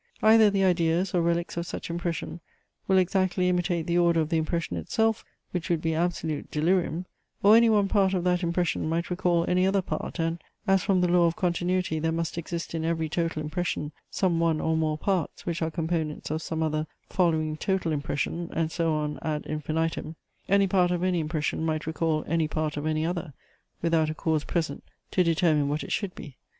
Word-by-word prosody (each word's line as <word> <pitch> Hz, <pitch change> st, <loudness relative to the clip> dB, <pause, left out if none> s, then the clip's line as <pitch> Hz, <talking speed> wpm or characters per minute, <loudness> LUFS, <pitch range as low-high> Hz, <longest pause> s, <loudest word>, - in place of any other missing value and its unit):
Either 220 Hz, -1 st, +7 dB
the 200 Hz, -1 st, +1 dB
ideas, 175 Hz, 0 st, +2 dB
or 175 Hz, -, +3 dB
reliques 170 Hz, +1 st, -1 dB
of 170 Hz, 0 st, -2 dB
such -, -, -5 dB
impression, 170 Hz, 0 st, -3 dB, 0.5 s
will 190 Hz, -, +4 dB
exactly 185 Hz, 0 st, +2 dB
imitate 175 Hz, -2 st, 0 dB
the 175 Hz, +1 st, +2 dB
order 170 Hz, -1 st, +3 dB
of 155 Hz, -1 st, 0 dB
the 165 Hz, -, +1 dB
impression 160 Hz, -, -1 dB
itself, 220 Hz, -, 0 dB, 0.3 s
which 175 Hz, -2 st, -3 dB
would 170 Hz, -2 st, +2 dB
be 160 Hz, 0 st, -1 dB
absolute 160 Hz, -2 st, -2 dB
delirium: 170 Hz, +1 st, 0 dB, 0.4 s
or 205 Hz, +2 st, +8 dB
any 230 Hz, 0 st, +6 dB
one 205 Hz, -2 st, +3 dB
part 195 Hz, -1 st, +2 dB
of 180 Hz, -, -1 dB
that 180 Hz, 0 st, +2 dB
impression 170 Hz, -2 st, 0 dB
might 170 Hz, +2 st, -1 dB
recall 175 Hz, -1 st, +1 dB
any 180 Hz, +1 st, +2 dB
other 195 Hz, 0 st, +2 dB
part, -, -, -4 dB
and 165 Hz, 0 st, -1 dB, 0.2 s
(as 195 Hz, -2 st, +3 dB
from 185 Hz, -1 st, +2 dB
the 180 Hz, -, +3 dB
law 175 Hz, -1 st, +4 dB
of 165 Hz, -, -1 dB
continuity, 180 Hz, -3 st, 0 dB
there 160 Hz, +1 st, 0 dB
must 165 Hz, -1 st, -2 dB
exist 170 Hz, 0 st, -5 dB
in 160 Hz, -1 st, -2 dB
every 160 Hz, -1 st, 0 dB
total 165 Hz, -1 st, -2 dB
impression, 155 Hz, -1 st, -2 dB, 0.2 s
some 175 Hz, -4 st, +1 dB
one 165 Hz, -2 st, +2 dB
or 160 Hz, +1 st, +1 dB
more 155 Hz, -1 st, 0 dB
parts, 185 Hz, -1 st, -2 dB
which 170 Hz, -1 st, -2 dB
are 160 Hz, -, +1 dB
components 160 Hz, -2 st, -2 dB
of 155 Hz, +1 st, -1 dB
some 160 Hz, 0 st, -2 dB
other 155 Hz, 0 st, -1 dB, 0.2 s
following 160 Hz, -4 st, +1 dB
total 190 Hz, 0 st, -1 dB
impression, 150 Hz, +3 st, -2 dB
and 165 Hz, -1 st, 0 dB
so 165 Hz, -2 st, 0 dB
on 150 Hz, -1 st, -2 dB
ad 150 Hz, -1 st, -2 dB
infinitum) 155 Hz, +1 st, -2 dB, 0.3 s
any 200 Hz, +1 st, +5 dB
part 180 Hz, -2 st, +3 dB
of 175 Hz, 0 st, -1 dB
any 185 Hz, -2 st, +1 dB
impression 155 Hz, 0 st, -2 dB
might 155 Hz, -1 st, -1 dB
recall 160 Hz, -1 st, 0 dB
any 165 Hz, -1 st, +1 dB
part 155 Hz, -1 st, -2 dB
of 145 Hz, +1 st, -3 dB
any 155 Hz, 0 st, 0 dB
other, 170 Hz, -3 st, -3 dB, 0.5 s
without 165 Hz, -2 st, +2 dB
a 155 Hz, -, -3 dB
cause 155 Hz, -1 st, 0 dB
present 160 Hz, -5 st, -2 dB, 0.3 s
to 185 Hz, -, +3 dB
determine 160 Hz, -4 st, +2 dB
what 150 Hz, +1 st, -1 dB
it -, -, -8 dB
should 200 Hz, -4 st, -2 dB
be. 140 Hz, -, -10 dB
170 Hz, 200 wpm, -27 LUFS, 155-180 Hz, 0.5 s, or